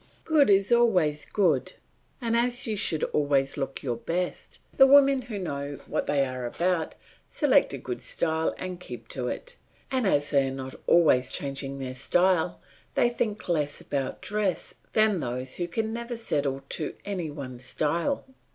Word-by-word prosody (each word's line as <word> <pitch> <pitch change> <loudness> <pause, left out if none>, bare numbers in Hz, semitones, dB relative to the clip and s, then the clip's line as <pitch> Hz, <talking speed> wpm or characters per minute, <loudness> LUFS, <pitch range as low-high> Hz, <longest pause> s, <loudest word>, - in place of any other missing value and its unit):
Good 305 -5 +4
is 195 +2 +4
always 180 -11 +3
good, 160 -11 +1 0.5
and 230 -1 0
as 245 +1 +1
you 220 - -1
should 170 -6 0
always 140 -2 +2
look 135 -2 -4
your 120 -4 -1
best, 175 +8 -3 0.2
the 270 - +8
women 275 -1 +6
who 240 -4 -6
know 140 -6 -4
what - - -2
they 140 -2 +2
are 130 -1 -5
about 170 +4 -1 0.3
select - - +3
a - - -5
good - - -5
style 160 -1 0
and 185 -1 -5
keep 180 - -9
to - - -3
it, - - -5 0.3
and 255 -5 +1
as 145 -5 +2
they 140 -2 +3
are - - -3
not 130 0 -6
always 135 -7 +4
changing 140 0 -3
their 130 -1 -5
style 175 +6 +2 0.4
they 240 - +4
think 220 -3 -3
less 150 -4 0
about 135 -2 -3
dress 205 -3 -1 0.2
than 215 -3 +3
those 125 -1 -4
who 175 - -2
can 220 +5 -2
never 235 +1 -4
settle 140 -11 -1
to 155 - -3
any 185 -6 -3
one 135 -4 -7
style. 155 - -1
165 Hz, 170 wpm, -27 LUFS, 140-215 Hz, 0.5 s, the